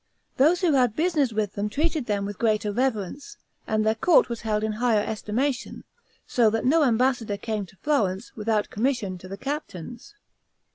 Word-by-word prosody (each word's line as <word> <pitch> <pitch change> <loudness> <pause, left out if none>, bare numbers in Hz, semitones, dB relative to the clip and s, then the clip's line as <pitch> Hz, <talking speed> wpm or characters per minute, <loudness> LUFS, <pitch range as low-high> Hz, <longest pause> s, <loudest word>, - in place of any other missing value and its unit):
Those 320 +7 +4
who 345 -5 +3
had 250 -5 +3
business 310 -6 +1
with 215 -2 -1
them 205 +1 -2
treated 305 +1 -1
them 200 -2 -1
with 205 -1 -6
greater 215 -2 +1
reverence, 255 - -2 0.3
and 215 0 +1
their 220 - +3
court 295 +8 +4
was 235 -1 -4
held 215 -1 -1
in 220 - 0
higher 220 -1 +1
estimation: 235 +5 -2 0.4
so 235 -3 +3
that 225 +2 -1
no 310 +5 +4
ambassador 240 -4 +1
came 210 -1 -3
to 190 - -20
Florence, 215 -9 0
without 215 -1 -1
commission 215 -5 -1
to 185 - -11
the 195 +1 -7
captains. 255 - -6
225 Hz, 175 wpm, -25 LUFS, 210-270 Hz, 0.4 s, Those